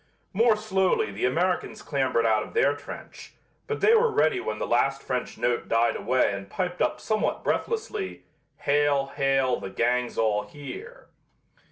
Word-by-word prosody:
More 225 +3 +4
slowly 190 - +1
the 100 +4 -2
Americans 175 +8 -1
clambered 130 -5 0
out 110 -1 +3
of - - -9
their 140 +1 +3
trench, 145 0 -10 0.3
but 445 - -3
they 440 - +6
were 465 +1 +5
ready 405 -3 +2
when - - -3
the - - -2
last 135 +3 +1
French 125 -1 -3
note 120 0 -1
died 115 +1 +2
away 130 -5 +1
and 100 0 -7
piped 180 - -3
up - - +1
somewhat 215 -1 -1
breathlessly: 435 -3 -2 0.4
"Hail! 140 -1 +2
Hail! 135 -2 +2
the - - -6
gang's 120 +5 0
all 105 -2 +2
here!" 390 - -10
140 Hz, 160 wpm, -26 LUFS, -, 0.4 s, they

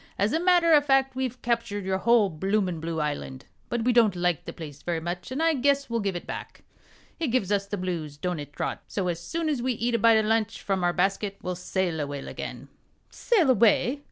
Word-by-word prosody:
As 205 +3 +1
a 320 - +2
matter 350 -2 +4
o' 295 - +7
fact, 270 -2 +2
we've 255 -1 -3
captured 230 -4 -1
your 190 0 0
whole 230 -3 +4
bloomin' 190 +1 -1
blue 165 0 -3
island, 145 -3 -4 0.2
but 240 -1 -1
we 245 +1 +2
don't 225 -5 +4
like 175 -3 0
the - - -5
place 145 -4 -9
very 170 -2 -2
much, 175 +4 -5
and 280 +5 -1
I 330 0 +4
guess 280 -1 +1
we'll 230 - +1
give 200 -3 -2
it 175 - -5
back. - - -8 0.6
It 325 - 0
gives 230 -6 0
us 200 -1 +1
the 205 +1 -3
blues 170 -6 -4
don't 180 +1 -2
it, 145 -1 -8
Trot? - - -4
so 185 -3 -2
as 170 -1 -3
soon 325 - -3
as 290 -5 0
we 255 +1 0
eat 235 +1 -1
a 230 - +2
bite 230 +1 +6
o' 215 -1 +1
lunch 225 0 0
from 190 -2 -1
our 175 - +3
basket 195 +2 0
we'll 180 - -2
sail 180 -2 -2
away 145 -1 -3
again." - - -7 0.4
"Sail 370 - +2
away? 240 +4 +3
205 Hz, 230 wpm, -26 LUFS, 175-250 Hz, 0.6 s, o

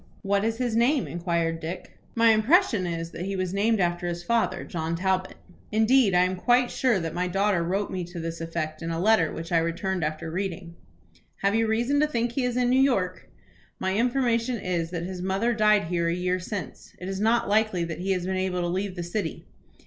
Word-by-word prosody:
"What 200 0 +1
is 225 +1 0
his 245 -3 -1
name?" 250 +4 +3
inquired 170 -1 -1
Dick. 170 +3 -6 0.2
"My 230 -1 +5
impression 220 - +3
is, 165 -1 -4
that 175 - -5
he 195 0 -3
was 185 -1 -2
named 215 +2 +2
after 175 -1 0
his 175 0 -4
father, 235 +4 0
John 165 -1 -3
Talbot. 185 +1 -1 0.4
Indeed, 220 -1 +4
I 180 - +5
am 185 0 -1
quite 245 +5 +3
sure 245 -7 +2
that 165 -2 -4
my 180 +1 -1
daughter 195 0 +1
wrote 190 +4 -1
me 185 -1 -3
to 175 0 -8
this 165 0 -5
effect 165 -1 -4
in 165 - -4
a 165 0 -2
letter 185 -4 +3
which 165 +2 -7
I 170 - +4
returned 170 +2 -2
after 155 +2 -3
reading." 180 -1 -4 0.7
"Have 200 0 +3
you 225 0 +2
reason 240 +6 +1
to 300 - +3
think 240 -4 -1
he 255 +2 -1
is 250 0 -1
in 250 -1 +2
New 260 +1 +4
York?" 195 -10 0 0.5
"My 190 0 -1
information 240 0 +1
is, 175 -5 -2
that 170 -1 -4
his 180 0 -5
mother 195 +6 0
died 215 -2 +4
here 170 0 -1
a 170 - 0
year 180 +1 0
since. 180 - -7
It 180 - -7
is 195 0 -3
not 225 +3 +2
likely 210 -4 +2
that 170 -1 -5
he 190 +2 -3
has 180 -1 -2
been 190 0 -1
able 185 -1 -1
to 175 - -1
leave 185 +2 -2
the 175 - -4
city." 185 +5 -4
190 Hz, 220 wpm, -26 LUFS, 170-225 Hz, 0.7 s, My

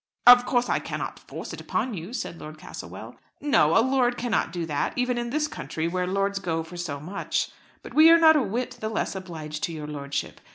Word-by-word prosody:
"Of 245 0 +9
course 245 -1 +2
I - - +1
cannot - - -5
force - - -8
it - - -7
upon 255 - -2
you," 175 +2 -6
said 205 -9 -5
Lord 155 0 -9
Castlewell. - - -9 0.2
"No; 210 - +4
a 230 - +5
lord 250 -2 +2
cannot 235 -7 0
do 170 -1 -3
that, 150 -3 -1
even 250 -1 0
in 240 0 -3
this 300 +4 0
country, 160 - -4
where 180 +1 -1
lords 195 +1 0
go 165 -4 -2
for 165 +2 -11
so 165 -5 -4
much. 180 +7 -2 0.3
But - - -10
we 315 +2 +8
are 335 - +8
not 320 -1 +7
a 300 - +4
whit 235 +3 -3
the 220 - -3
less 220 - -2
obliged 160 -5 -6
to - - -6
your 155 -2 -6
lordship. 140 -1 -4
195 Hz, 220 wpm, -26 LUFS, 160-245 Hz, 0.3 s, Of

